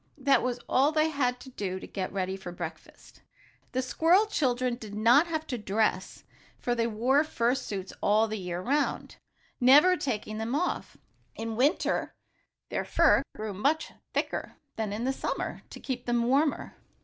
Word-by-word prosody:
That 275 -3 +3
was 250 -1 -2
all 275 +4 +3
they 310 0 +2
had 250 -5 0
to 260 - -11
do 190 -5 -4
to - - -9
get 190 -2 -4
ready 190 -1 -2
for 190 -2 -8
breakfast. 170 -2 -9 0.5
The 255 +1 -1
squirrel 335 +10 +3
children 255 - 0
did 215 -4 -9
not 240 +10 +5
have 315 -2 -3
to 250 -3 -4
dress, 205 -2 -1 0.3
for 245 - -1
they 230 -1 0
wore 235 +5 +1
their 300 - +4
fur 235 +1 +1
suits 200 -8 -5
all 215 +2 +3
the 215 -1 -4
year 180 -1 -4
'round, 285 +5 -1 0.4
never 290 +9 +7
taking 220 - -3
them 230 +4 -2
off. 355 +4 -2 0.4
In 225 0 -4
winter 280 - +1 0.5
their - - -2
fur - - +4
grew 215 -1 -5
much 285 +11 0 0.2
thicker - - -2 0.2
than 220 -2 -2
in 235 +6 -1
summer, - - -3
to - - -10
keep 250 -2 -5
them 240 -1 +2
warmer. 275 +5 +1
245 Hz, 170 wpm, -28 LUFS, 215-275 Hz, 0.5 s, never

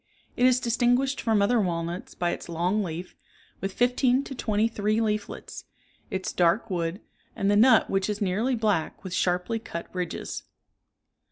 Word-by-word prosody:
It 250 - +4
is 255 -1 +4
distinguished 245 +3 +1
from 220 -3 +2
other 235 +2 +3
walnuts 170 -1 -3
by 175 -1 0
its - - -6
long 175 +5 0
leaf, 175 0 -6 0.4
with 195 - -3
fifteen 250 +4 +2
to 275 - -7
twenty 215 -3 +1
three 215 -1 0
leaflets, 215 -2 -3 0.4
its 190 0 -3
dark 180 +5 +2
wood, 170 +2 -2 0.3
and 200 0 +1
the - - +4
nut 225 +2 +6
which 195 +1 0
is 210 -1 -2
nearly 215 +6 +1
black 210 -9 -1
with 185 -2 -6
sharply 180 +6 0
cut 170 -6 -7
ridges. 180 -2 -4
205 Hz, 160 wpm, -26 LUFS, 180-235 Hz, 0.4 s, nut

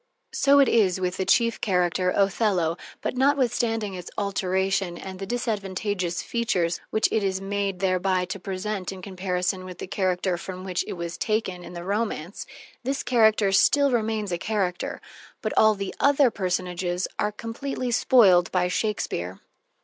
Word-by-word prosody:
So 280 +1 +4
it 275 - +6
is 190 -5 +3
with 180 -1 -2
the 190 - -1
chief 230 -1 +3
character, 180 -2 +1
Othello, 195 -4 +1 0.3
but - - -2
notwithstanding 240 -6 +1
its 180 -1 -7
alteration 190 -2 0
and 190 0 -8
the 195 - -5
disadvantageous 200 -5 -2
features 180 -8 0
which 220 - +2
it 220 - +1
is 190 -1 0
made 195 -1 -2
thereby 185 -1 +1
to 195 +2 -6
present 190 0 -4
in 190 -1 -9
comparison 185 0 -2
with 185 -1 -9
the - - -6
character 185 -1 0
from 185 0 -7
which 185 -2 -1
it - - -4
was 170 -1 -6
taken 215 -5 -1
in 175 - -10
the 170 0 -6
romance, 200 -3 -3 0.4
this 270 +2 -2
character 220 -4 +3
still 280 +8 +4
remains 220 -4 -1
a 175 - -1
character, 190 -4 -2 0.4
but - - -3
all 215 0 +5
the 195 -1 -4
other 280 -3 +4
personages 180 -2 -2
are 210 - +1
completely 245 +4 -4
spoiled 200 -8 +5
by 180 -1 +2
Shakespeare. 180 - -2
195 Hz, 155 wpm, -25 LUFS, 180-220 Hz, 0.4 s, it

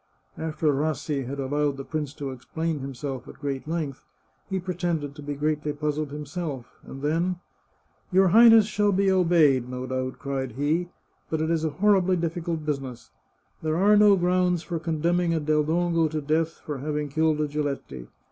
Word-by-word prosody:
After 155 -1 0
Rassi 145 -2 -1
had 140 +2 -5
allowed 145 +1 0
the 135 - -5
prince 150 -3 -3
to 140 -2 -5
explain 160 +5 -3
himself 135 -1 -5
at - - -10
great 140 -1 -4
length, 155 -5 -3 0.5
he 190 -1 -1
pretended 175 -5 -2
to 150 - -11
be 145 0 -4
greatly 150 0 -1
puzzled 150 0 -2
himself, 150 -2 -5 0.2
and 135 +1 -10
then 170 +5 +1 0.3
— - - -41
" - - -40
Your 190 0 +5
Highness 225 +2 +8
shall 210 -1 +1
be 195 0 +2
obeyed, 165 -9 +4
no 125 0 -4
doubt," 130 0 -3
cried 135 -3 -3
he. 155 +7 0 0.2
" - - -42
But 160 - -1
it 160 +1 0
is 165 -1 +1
a 160 - +1
horribly 185 +2 +3
difficult 165 -1 -3
business. 130 -6 -4 0.5
There 155 0 0
are 205 +3 +5
no 210 -1 +7
grounds 180 -1 +1
for 170 -2 -3
condemning 170 +1 0
a - - +1
Del 150 0 +2
Dongo 165 +1 +1
to 155 0 -2
death 160 +2 0
for 145 -3 -4
having 150 +1 -2
killed 155 +1 +1
a 150 - +1
Giletti. 140 - -4
155 Hz, 185 wpm, -26 LUFS, 140-170 Hz, 0.5 s, Highness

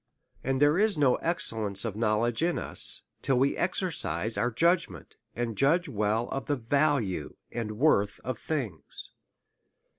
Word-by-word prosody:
And 135 0 -1
there 145 +4 +4
is 210 -4 +2
no 135 -4 +3
excellence 110 - -1
of 110 - -2
any 105 - -9
knowledge 115 +2 +1
in 170 +1 +1
us, - - +4 0.2
till 135 -2 +1
we 135 +2 +2
exercise 135 - -1
our 110 +5 0
judgment, 165 - 0 0.2
and 120 -2 -3
judge 165 - +2
well 110 -1 -1
of 135 - -4
the 145 - +1
value 135 -4 0 0.2
and 110 -2 -5
worth 105 -7 +2
of 125 -3 -4
things. 115 - -4
125 Hz, 150 wpm, -28 LUFS, 110-150 Hz, 0.2 s, there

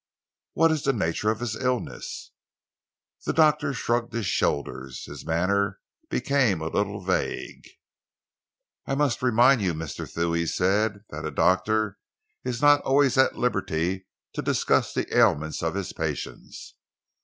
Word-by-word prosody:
"What 165 +1 +4
is 155 -2 0
the 135 - +1
nature 105 -1 0
of 110 +1 -1
his 115 -3 -2
illness?" 125 +1 -3 1.0
The - - +1
doctor 150 -1 +3
shrugged 120 -3 -1
his 115 -2 -2
shoulders. 70 -6 -2
His - - -9
manner 100 +4 0 0.3
became 130 - +1
a 80 0 -3
little 100 +2 -1
vague. 95 0 -2 1.2
"I 135 - 0
must 140 -4 +1
remind 125 0 +4
you, 90 -4 0
Mr. 80 -1 -6
Thew," 85 0 -1
he 85 0 0
said, 100 +3 +1
"that 80 +1 -6
a - - -2
doctor 105 +4 +1 0.4
is 125 +1 -3
not 145 0 +6
always 135 -1 +3
at 130 0 +3
liberty 95 -5 -1 0.3
to - - -3
discuss - - +1
the - - -3
ailments 80 +1 +3
of 80 +2 -1
his 100 -2 -3
patients. 80 -3 -5
105 Hz, 145 wpm, -26 LUFS, 85-125 Hz, 1.2 s, not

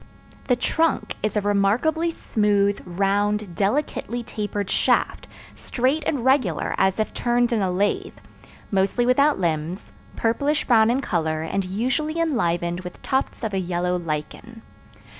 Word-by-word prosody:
The 250 - +4
trunk 280 -2 0
is 215 0 -1
a - - +2
remarkably 210 +12 +1
smooth, 205 -8 +1
round, 200 +2 0
delicately 240 - -1
tapered 205 -3 -4
shaft, - - +1 0.3
straight 265 +5 -1
and 265 -5 -1
regular 260 - +2
as 190 +2 +2
if 215 - -1
turned 240 0 +1
in 220 - +1
a 190 - +1
lathe, 195 +3 -1 0.5
mostly 195 +5 +1
without 280 +4 +3
limbs, 170 +1 -2 0.2
purplish 280 +7 0
brown 225 -3 +5
in 255 +3 +1
color 160 - -1
and 195 +4 -1
usually 260 - -1
enlivened 175 - 0
with 180 -1 -9
tufts 265 -1 -1
of 220 -2 -2
a 190 - +1
yellow 180 0 -1
lichen. 175 +8 -5
210 Hz, 140 wpm, -23 LUFS, 185-250 Hz, 0.5 s, brown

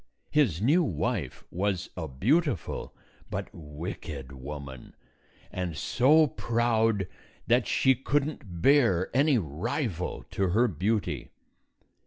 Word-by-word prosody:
His 115 - +2
new 160 +9 +4
wife 95 - -2
was 95 0 -1
a 80 -3 -4
beautiful 120 - 0 0.4
but - - -4
wicked 75 -3 -7
woman, 70 -1 -8 0.6
and 90 -4 -3
so 150 +6 +4
proud 115 -6 +1 0.4
that 120 -1 +3
she 130 - +4
could 135 +3 0
n't 95 - -8
bear 120 -10 +4
any 140 0 +4
rival 95 - -3
to 95 - 0
her 115 +7 +3
beauty. 100 +2 -1
105 Hz, 110 wpm, -28 LUFS, 85-130 Hz, 0.6 s, new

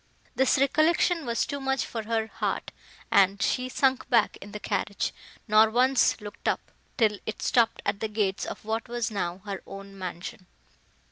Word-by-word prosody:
This 265 +2 +3
recollection 310 +3 +2
was 235 0 +1
too 285 -1 -4
much 270 0 0
for 230 - -4
her 225 0 0
heart, 220 - -3 0.4
and 195 0 +4
she 255 +4 0
sunk 265 0 +1
back 230 -4 +3
in 205 - -9
the 210 - -6
carriage, 205 0 -2 0.3
nor 215 +1 +6
once 255 +3 +3
looked 205 -1 -8
up, - - -1 0.3
till 215 -4 +2
it 220 - -4
stopped 230 -2 +2
at 200 - 0
the 220 - -1
gates 210 -3 -1
of - - -7
what 225 +2 -2
was 240 -1 -2
now 185 -2 -3
her 200 -2 -4
own 195 0 -9
mansion. 185 0 -7
220 Hz, 175 wpm, -27 LUFS, 200-255 Hz, 0.4 s, nor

